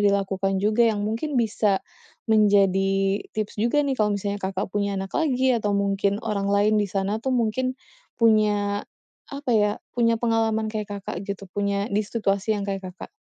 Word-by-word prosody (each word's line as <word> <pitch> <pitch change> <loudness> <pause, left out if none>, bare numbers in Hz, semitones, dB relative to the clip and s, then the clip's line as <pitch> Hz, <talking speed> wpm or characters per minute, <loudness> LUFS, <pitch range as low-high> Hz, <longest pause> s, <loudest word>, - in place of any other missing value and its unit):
dilakukan 195 -1 +1
juga 215 +3 +3
yang 210 -2 -1
mungkin 235 +7 -2
bisa 210 -4 +1 0.4
menjadi 195 -2 +3 0.2
tips 210 -1 -3
juga 285 +6 +2
nih 275 - 0
kalau 210 -1 +2
misalnya 200 0 -3
Kakak 190 0 -3
punya 200 -1 -1
anak 190 0 -5
lagi, 260 -5 +2
atau 210 -4 0
mungkin 200 0 +1
orang 200 -2 -1
lain 210 +1 +3
di 205 - -1
sana 195 +3 -1
tuh 260 +2 -1
mungkin 255 +3 0 0.4
punya 210 -3 +2 0.5
apa 280 -1 -5
ya, 210 -2 +3 0.2
punya 230 -1 +2
pengalaman 225 -1 0
kayak 210 -1 -3
Kakak 185 -2 -5
gitu, 200 -1 -5
punya 200 0 0
di 205 - +2
situasi 210 -1 -1
yang 200 - -3
kayak 195 -1 -3
Kakak? 180 - -10
205 Hz, 170 wpm, -24 LUFS, 200-225 Hz, 0.5 s, juga